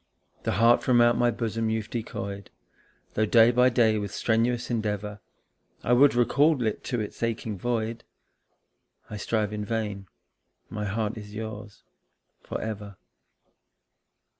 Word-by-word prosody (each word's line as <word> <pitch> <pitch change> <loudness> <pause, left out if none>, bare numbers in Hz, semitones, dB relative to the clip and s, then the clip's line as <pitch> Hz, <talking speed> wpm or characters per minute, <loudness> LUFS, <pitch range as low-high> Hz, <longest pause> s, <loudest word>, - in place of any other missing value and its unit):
The - - +1
heart 115 +4 +5
from 125 -2 +3
out 120 0 +5
my 120 - +3
bosom 115 -1 -2
you've 110 -1 -3
decoyed, 100 -4 -5 0.6
Though 110 0 +1
day 115 +2 +6
by 125 +1 +4
day 115 -3 +3
with 100 -1 -4
strenuous 120 +3 0
endeavour 105 -2 -2 0.6
I 120 - +2
would 135 +1 +5
recall 140 +5 +3
it 110 - -2
to 125 -2 -1
its 105 - -6
aching 115 -2 -2
void. 115 +2 -2 1.1
I 105 - -4
strive 105 +1 -1
in 105 0 -3
vain 105 -3 -3 0.6
my 105 -1 -3
heart 105 +2 -2
is 105 0 -11
yours 110 -1 -7 0.6
for - - -5
ever. 105 -2 -6
110 Hz, 140 wpm, -26 LUFS, 105-120 Hz, 1.1 s, day